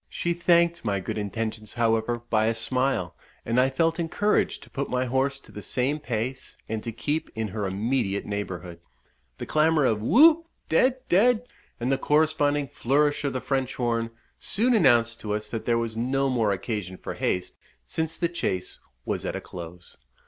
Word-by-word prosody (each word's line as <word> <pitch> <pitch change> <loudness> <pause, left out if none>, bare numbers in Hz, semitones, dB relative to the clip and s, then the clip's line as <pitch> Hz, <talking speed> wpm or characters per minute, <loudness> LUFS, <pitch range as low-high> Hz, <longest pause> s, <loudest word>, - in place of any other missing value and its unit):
She 170 - -1
thanked 170 0 +3
my 100 -3 0
good 95 +3 -4
intentions, 110 +1 -4
however, 115 0 +1
by 110 -1 +3
a 115 - +1
smile, 125 - 0 0.3
and 115 +2 +2
I 130 - +3
felt 165 +3 +1
encouraged 200 +5 +1
to - - -15
put 140 - -3
my 125 0 0
horse 135 +2 0
to - - -14
the 105 - -8
same 130 +8 0
pace, 125 0 -4
and 110 -1 -3
to 115 - -3
keep 145 +8 -2
in 110 -1 -2
her 105 0 -3
immediate 100 +1 -1
neighbourhood. 90 -4 -5 0.6
The - - -5
clamour 155 -1 +3
of 110 -4 +1
"Whoop! 320 - +6 0.2
dead! 260 0 +2
dead!" 230 +6 +4 0.3
and 120 +3 -1
the 135 - +1
corresponding 145 -1 +2
flourish 145 +6 +1
of 140 - -1
the 130 - -2
French 135 -2 -1
horn, 115 -2 0 0.3
soon 245 +5 +1
announced 120 - +4
to 105 -1 -2
us 105 0 -5
that 115 - -4
there 120 -1 +3
was 115 -1 -2
no 135 +4 0
more 115 -5 +2
occasion 95 -2 -3
for - - -6
haste, 90 0 -2 0.3
since 160 0 -2
the 170 - +1
chase 95 - -3 0.3
was - - -2
at - - -3
a - - -2
close. 85 0 -10
125 Hz, 180 wpm, -26 LUFS, 110-150 Hz, 0.6 s, Whoop